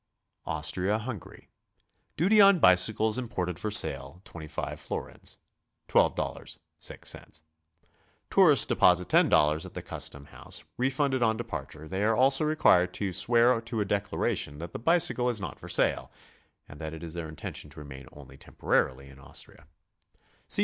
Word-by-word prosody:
AUSTRIA 90 +7 -1
HUNGARY. 110 -3 -8 0.7
Duty 205 +6 +5
on 200 -1 +7
bicycles 110 - +3
imported 90 -8 -4
for 110 - -3
sale, 100 -4 +1
25 80 -2 -7
florins, - - -6 0.3
— - - -53
$12.06. 75 - -3 0.9
Tourists - - +6
deposit 90 0 +3
$10 75 +1 +3
at - - -9
the - - -6
cus - - -2
tom 70 0 -13
house, - - -5
refunded 135 +1 0
on 110 -1 +2
departure; 80 - -7
they 95 +4 -3
are 110 +1 +2
also 135 +3 +5
required 150 - +3
to 95 -3 -3
swear 115 +4 +3
to 115 -1 -5
a 105 - 0
declaration 100 -7 -2
that 85 +2 -8
the - - -5
bicycle 135 -3 +2
is 120 -3 -2
not 90 -8 -7
for - - -10
sale - - +1 0.6
and 75 - -12
that 80 0 -5
it 80 - -10
is 80 -2 -7
their 85 -2 -6
intention 80 - -7
to - - -12
remain 70 -2 -10
only 70 -2 -14
temporarily 70 0 -1
in 65 0 -15
Aus 70 - -5
tria. 85 - -20
95 Hz, 150 wpm, -28 LUFS, 80-120 Hz, 0.9 s, on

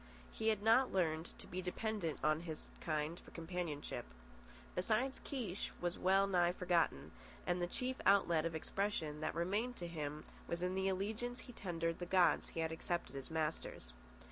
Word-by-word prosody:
He 220 - -2
had 215 -2 +3
not 230 +4 +6
learned 165 -3 0
to - - -8
be 185 - -4
dependent 185 -2 -1
on 155 0 +4
his 160 -2 -6
kind 155 +1 -1
for - - -14
companionship. 165 -3 -4 0.7
Besides, 225 +8 +1
Kiche 220 -9 -3
was 175 0 -1
well 195 +2 +5
nigh 175 -3 +3
forgotten; 175 - +1 0.3
and 175 0 +1
the 175 - +1
chief 255 +7 -2
outlet 175 -5 +5
of 165 -1 -1
expression 160 -3 -1
that 155 - -1
remained 205 +9 0
to 175 - -5
him 150 -2 -4 0.2
was 170 +1 -2
in 180 0 +1
the 190 0 +1
allegiance 220 +6 -2
he 245 - -10
tendered 165 -5 -2
the 175 - -3
gods 180 -1 +4
he 165 - -2
had 160 0 0
accepted 160 -4 -2
as 135 - -4
masters. 155 - -2
175 Hz, 170 wpm, -38 LUFS, 160-200 Hz, 0.7 s, not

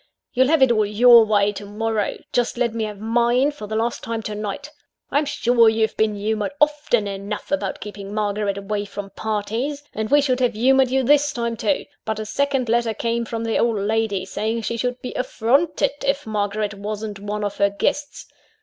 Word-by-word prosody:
You'll 260 0 +4
have 305 -2 +4
it 260 - +5
all 215 -2 +3
your 230 +3 +7
way 205 -1 +2
to 205 - -8
morrow 210 +1 -2 0.2
just 245 0 0
let 235 -2 0
me 225 -1 -1
have 210 -2 -7
mine, 240 +5 +2
for 250 -8 -9
the 215 - -4
last 230 +2 -1
time, 230 -1 -3
to 210 - -4
night. 210 +8 -5 0.4
I'm 290 +2 +2
sure 245 -5 +4
you've 220 0 0
been 215 -1 +1
humoured 215 +4 -2
often 295 -7 +2
enough 200 +4 -5
about 290 - -1
keeping 205 -1 -8
Margaret 205 -1 -1
away 205 +1 -3
from 200 0 -7
parties 225 +7 -3
and 220 0 -3
we 290 - +5
should 260 -3 +1
have 250 -2 +2
humoured 260 +3 +4
you 265 +1 +1
this 290 +2 +4
time, 235 -2 -2
too; 205 -3 0 0.2
but 220 -1 -2
a 215 - -4
second 275 +1 0
letter 230 -1 +1
came 235 +1 -1
from 230 0 -4
the 225 -1 0
old 230 -2 +2
lady, 205 -1 0
saying 220 +4 -2
she 235 - -2
should 250 +1 -2
be 250 - -5
affronted 275 +5 +1
if 280 +1 0
Margaret 210 -1 -2
wasn't 205 0 -5
one 210 +1 -4
of 205 -1 -3
her 200 0 +3
guests. 290 +8 -2
225 Hz, 200 wpm, -22 LUFS, 210-250 Hz, 0.4 s, your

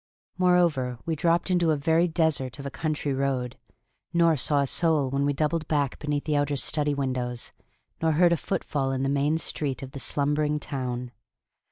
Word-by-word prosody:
Moreover, 170 -9 +2
we 165 - -1
dropped 170 +4 +1
into 175 -2 +3
a 155 - +3
very 160 +4 +2
desert 160 -6 0
of 140 - -8
a 140 - -4
country 150 -2 -2
road, 130 -2 -1 0.6
nor 170 -1 +4
saw 145 +1 +1
a - - +1
soul 150 -2 +1
when 140 +1 +1
we 145 - +2
doubled 155 +2 -1
back 145 -3 0
beneath 145 -1 -2
the 150 -1 0
outer 145 0 +1
study 145 +1 +1
windows, 125 -3 -2 0.5
nor 160 -1 +2
heard 170 +2 +5
a - - +1
footfall 135 -3 -2
in 130 0 -1
the 135 - +1
main 145 +3 +1
street 140 -4 -3
of 135 - -8
the 140 - -7
slumbering 150 +3 0
town. 125 -3 -4
145 Hz, 185 wpm, -26 LUFS, 135-160 Hz, 0.6 s, heard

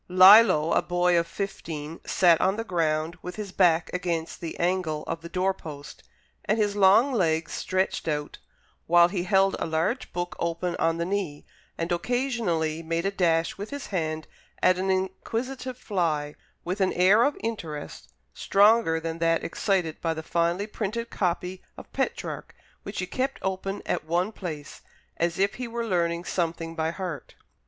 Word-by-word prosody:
Lillo, 185 -3 +7
a - - +4
boy 175 0 +2
of 170 0 +2
fifteen, 165 -6 -5
sat 170 -3 +4
on 190 +1 +2
the 225 - -3
ground, 165 -3 -1
with 180 - -7
his 210 -3 -6
back 175 -3 +3
against 170 -3 -3
the 165 -2 -6
angle 175 -3 0
of 165 - -4
the 170 - -9
door 185 +2 +1
post, 145 -5 -10 0.4
and 215 - +1
his 205 -2 +1
long 205 +7 +5
legs 165 -7 +1
stretched 185 -1 -1
out, 150 -1 -3 0.5
while 175 +1 +6
he 180 -2 -2
held 195 0 +3
a - - -2
large 160 +11 -1
book 175 0 -4
open 170 +1 -1
on 165 0 +1
his 170 0 -2
knee, 185 -7 -3 0.3
and 165 +1 -3
occasionally 175 - -1
made 165 +2 -2
a 195 - +1
dash 170 -2 +1
with 205 - -5
his 285 -2 -6
hand 155 -3 -2 0.4
at 185 0 +4
an 190 +1 -1
inquisitive 235 +7 -2
fly, 160 -10 -1 0.3
with 185 +3 -2
an 190 - +2
air 190 +5 +5
of 285 +4 +2
interest 165 -10 -5 0.2
stronger 200 -5 +4
than 165 0 -5
that 165 0 +2
excited 175 -3 -1
by 165 -1 0
the 160 - -5
finely 170 +4 0
printed 220 +2 -4
copy 180 0 -2 0.2
of - - -12
Petrarch - - -3 0.3
which 200 - -8
he 180 - -1
kept 265 +7 -2
open 190 +1 -3
at - - -2
one 175 +6 0
place, 155 -9 -7 0.4
as 170 0 0
if 200 +1 +2
he 250 - -2
were 235 0 -3
learning 170 -3 0
something 165 -2 -2
by 160 -1 -1
heart. 170 -6 -6
180 Hz, 170 wpm, -26 LUFS, 165-195 Hz, 0.5 s, Lillo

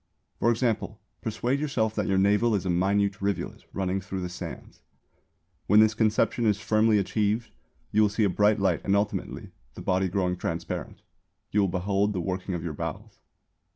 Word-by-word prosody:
For 115 - +3
example 115 -2 0 0.2
persuade 120 +5 -1
yourself 125 -7 0
that 105 -3 -1
your 95 - +2
navel 105 +4 +3
is 95 - -2
a 90 - +1
minute 100 +3 +1
rivulet 100 0 -3
running 95 0 -1
through 95 +1 -5
the 90 - -3
sands. 90 - -8 0.9
When 105 +2 +6
this 110 0 +5
conception 110 +1 +1
is 105 -1 +2
firmly 110 +1 +3
achieved, 105 +3 0 0.4
you 105 - +3
will 105 - +4
see 105 +2 0
a - - +4
bright 105 +3 +3
light 95 -4 +1
and 100 - +2
ultimately, 100 +1 -2 0.2
the - - -8
body 95 0 +1
growing 90 -1 0
transparent, 85 -1 -4 0.5
you 105 - +3
will 100 - +3
behold 100 +3 0
the 95 - -2
working 95 +1 -3
of 85 - -4
your 85 -3 -3
bowels. - - -6
100 Hz, 180 wpm, -27 LUFS, 95-110 Hz, 0.9 s, When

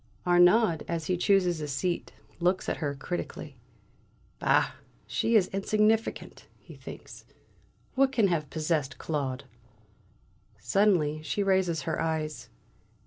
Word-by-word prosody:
Arnaud, 175 0 +5
as 165 -2 -3
he 180 - 0
chooses 180 -3 +2
a 150 - -3
seat, 170 +5 -2 0.3
looks 180 +2 +1
at - - -1
her 145 -3 -3
critically. 155 -1 -6 0.8
"Bah, - - +3 0.3
she 230 - 0
is 205 -4 +6
insignificant!" 215 +3 0
he - - -15
thinks. - - -11 0.7
"What 270 0 +3
can 225 -6 +3
have 160 -5 -1
possessed 155 -3 -1
Claude?" 140 -4 -3 1.1
Suddenly 155 - +2
she 200 +6 -2
raises 190 -6 +1
her 160 - -2
eyes. 160 -2 -3
170 Hz, 120 wpm, -28 LUFS, 155-195 Hz, 1.1 s, is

